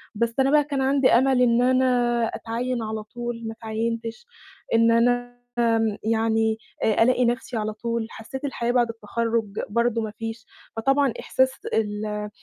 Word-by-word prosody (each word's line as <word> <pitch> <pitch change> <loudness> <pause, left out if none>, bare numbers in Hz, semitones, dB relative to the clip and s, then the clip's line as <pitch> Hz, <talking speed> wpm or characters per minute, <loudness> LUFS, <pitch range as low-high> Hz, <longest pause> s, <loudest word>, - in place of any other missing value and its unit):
بس 230 +1 -1
أنا 270 +1 +3
بقى 300 -1 +5
كان 280 -2 -2
عندي 270 0 +3
أمل 255 +1 +4
إن 240 0 +4
أنا 250 -2 +2
أتعيّن 235 +1 -3
على 215 0 -4
طول، 240 +1 -6
ما 225 - -4
أتعيّنتش، 230 - -4 0.5
إن 230 0 +5
أنا 245 +1 +1 0.2
آمم 225 -2 +2
يعني 225 0 +1 0.3
آآ 220 +1 +4
ألاقي 250 0 +3
نَفْسي 240 0 -1
على 215 0 -2
طول، 230 0 -3
حسّيت 265 +5 -7
الحياة 240 -3 -1
بعد 240 -2 +2
التخرُّج 225 -1 -2
برضه 235 +1 +1
ما 215 -1 -4
فيش، 225 +1 -5 0.3
فطبعًا 270 +2 +2
إحساس 260 0 +2 0.2
ال 210 -1 -2
235 Hz, 155 wpm, -24 LUFS, 225-245 Hz, 0.5 s, بقى